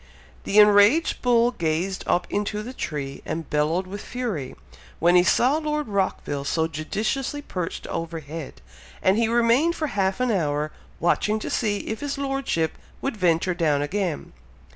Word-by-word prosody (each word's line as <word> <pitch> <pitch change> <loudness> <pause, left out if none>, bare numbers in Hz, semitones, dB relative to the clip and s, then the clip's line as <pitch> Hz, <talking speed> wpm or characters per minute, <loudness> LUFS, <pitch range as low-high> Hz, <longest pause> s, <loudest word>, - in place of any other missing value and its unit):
The 205 - 0
enraged 210 +9 +6
bull 240 -1 +4
gazed 170 0 -1
up 175 - +2
into 210 +1 -1
the 250 +4 -7
tree 145 - -5
and 165 -1 -4
bellowed 155 +5 +1
with 195 +2 -7
fury, 215 - -4 0.4
when 175 +2 +4
he 180 - +8
saw 255 +9 +3
Lord 300 -1 -2
Rockville 190 -8 -1
so 160 +3 0
judiciously 215 - -2
perched 180 - -4
overhead, 165 -2 -6 0.4
and 190 - +4
he 230 - +3
remained 240 +8 +3
for 310 -2 -2
half 195 0 0
an 250 -1 +1
hour, 150 -5 0 0.3
watching 210 +5 +2
to 215 - -5
see 205 -3 0
if 220 - -5
his 285 -1 -3
Lordship 270 - -1 0.2
would 275 -3 -2
venture 180 -2 +2
down 150 -4 +1
again. 180 0 -3
195 Hz, 155 wpm, -24 LUFS, 165-240 Hz, 0.4 s, he